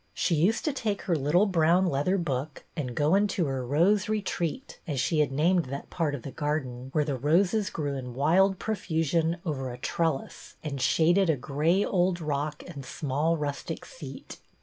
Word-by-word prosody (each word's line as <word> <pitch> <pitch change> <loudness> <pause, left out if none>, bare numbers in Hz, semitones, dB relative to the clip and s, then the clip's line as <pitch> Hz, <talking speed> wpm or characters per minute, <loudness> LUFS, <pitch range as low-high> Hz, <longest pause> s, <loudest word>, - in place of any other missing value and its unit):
She - - +1
used 175 +9 +2
to 305 - +1
take 215 -6 -2
her 175 - +1
little 155 +7 +3
brown 180 -1 +3
leather 175 +4 +1
book 145 -4 -3
and 130 -7 -4
go 150 +3 +2
into 195 -3 +2
her 135 -2 -2
Rose 180 +11 +2
Retreat, 210 - -2
as 145 -5 -2
she 155 +5 +1
had 150 -2 +2
named 170 +5 +2
that 140 +2 -7
part 155 -4 0
of 125 - -8
their 140 - -6
garden 135 -5 -3
where 150 +1 +2
the 140 -2 -1
roses 185 - +2
grew 145 -3 -3
in 125 -2 -6
wild 185 +8 +3
profusion 165 -5 0
over 135 -5 -2
a 120 - -7
trellis 160 +2 -2
and 140 -4 -4
shaded 170 +8 +3
a 155 - +3
gray 155 +9 +1
old 180 -1 +1
rock 150 -1 -3
and 140 - -8
small 150 +5 -1
rustic 145 -2 -4
seat. - - -10
160 Hz, 180 wpm, -28 LUFS, 140-180 Hz, -, little